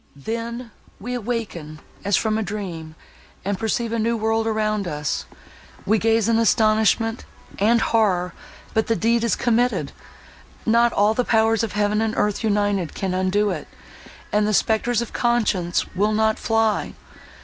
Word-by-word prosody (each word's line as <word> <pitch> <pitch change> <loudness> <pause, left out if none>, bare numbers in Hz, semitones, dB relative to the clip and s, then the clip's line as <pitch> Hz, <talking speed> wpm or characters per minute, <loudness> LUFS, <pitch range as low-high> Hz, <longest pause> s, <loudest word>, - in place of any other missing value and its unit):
Then, 230 - -5 0.3
we 245 +5 -5
awaken 215 -10 -4 0.2
as 200 0 +2
from 220 -1 0
a 220 - 0
dream, 180 -7 -5 0.5
and 200 -1 -1
perceive 225 +1 -1
a 230 - -1
new 230 +1 +1
world 225 0 0
around 215 -2 0
us—we 150 +7 -4
gaze 225 0 +2
in 230 -1 +3
astonishment, 225 0 +2 0.4
and 225 +4 +4
horror—but 210 0 -1
the 230 - +2
deed 230 +2 +1
is 235 - +2
committed; 240 +1 +1 0.7
not 235 +1 +4
all 205 +1 +3
the 250 - +1
powers 225 -1 +2
of 225 - -3
heaven 210 +1 +1
and 225 0 -1
earth 210 +2 0
united 205 -5 0
can 190 -2 -2
undo 190 +3 +1
it—and 210 0 -5
the 215 - +2
spectres 230 +2 +1
of 235 - -10
conscience 210 -8 +1
will 210 +3 +1
not 220 0 +1
fly! 225 -1 0
220 Hz, 145 wpm, -22 LUFS, 205-230 Hz, 0.7 s, and